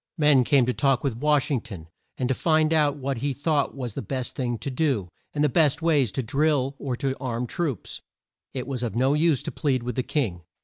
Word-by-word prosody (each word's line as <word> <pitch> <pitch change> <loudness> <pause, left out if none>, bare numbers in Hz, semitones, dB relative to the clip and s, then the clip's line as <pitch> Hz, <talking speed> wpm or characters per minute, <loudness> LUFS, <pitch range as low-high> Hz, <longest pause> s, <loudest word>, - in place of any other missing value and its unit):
Men 150 -4 +5
came 135 -1 +4
to 125 - 0
talk 135 -2 +1
with 135 -5 -1
Wash 150 +1 +2
ing 130 -5 +1
ton 95 -10 -9 0.3
and 125 - 0
to 130 - +2
find 155 +2 +2
out 150 -2 +3
what 135 -1 -2
he 140 +4 -1
thought 145 +1 0
was 125 -5 -5
the - - -4
best 130 +3 -4
thing 120 -3 -2
to 140 - -5
do, 130 - 0 0.2
and 150 - 0
the - - +5
best 150 +1 +2
way 150 -6 +3
to 130 +5 -3
drill 140 +1 +1
or 130 -3 -2
to 135 +1 -2
arm 125 -2 -2
troops. 140 - -3 0.5
It 130 -2 -4
was 130 -2 -4
of 115 -5 -3
no 130 +4 +3
use 155 -2 +2
to - - -4
plead 135 -6 0
with 125 -1 -3
the - - +1
king. 120 - -2
135 Hz, 230 wpm, -25 LUFS, 125-150 Hz, 0.5 s, Men